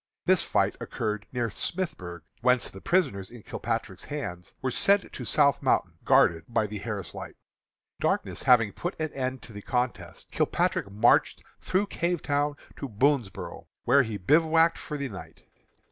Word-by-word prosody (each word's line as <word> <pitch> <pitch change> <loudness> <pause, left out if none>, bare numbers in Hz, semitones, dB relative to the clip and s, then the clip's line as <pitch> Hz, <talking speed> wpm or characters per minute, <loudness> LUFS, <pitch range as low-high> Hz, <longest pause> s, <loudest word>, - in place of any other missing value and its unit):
This - - +5
fight - - +1
occurred 105 -1 -3
near 120 -2 -1
Smithburg, 95 - -4 0.2
whence 125 0 +2
the 95 - -11
prisoners 100 - +1
in 120 -3 -12
Kilpatrick's 95 - -4
hands 100 -13 -6
were 130 - -1
sent 200 +8 +2
to - - -6
South 140 -2 +3
Mountain, - - +1
guarded 80 -1 +4
by 110 -2 +1
the 105 0 -5
Harris 105 -3 -5
Light. - - -8 0.6
Darkness - - -1
having 115 -5 +5
put 175 0 -5
an 155 -1 -2
end 130 -2 -3
to 115 - -12
the 105 - -7
contest, 125 +2 -3
Kilpatrick - - 0
marched 105 +4 +3 0.2
through 190 +2 +1
Cavetown 150 -6 0 0.2
to 140 - -5
Boonsboro', 125 -2 0 0.2
where 140 +3 +5
he 110 -5 -3
bivouacked 160 - +4
for 150 - -5
the 140 -1 -3
night. 100 -6 -10
125 Hz, 155 wpm, -27 LUFS, 105-150 Hz, 0.6 s, This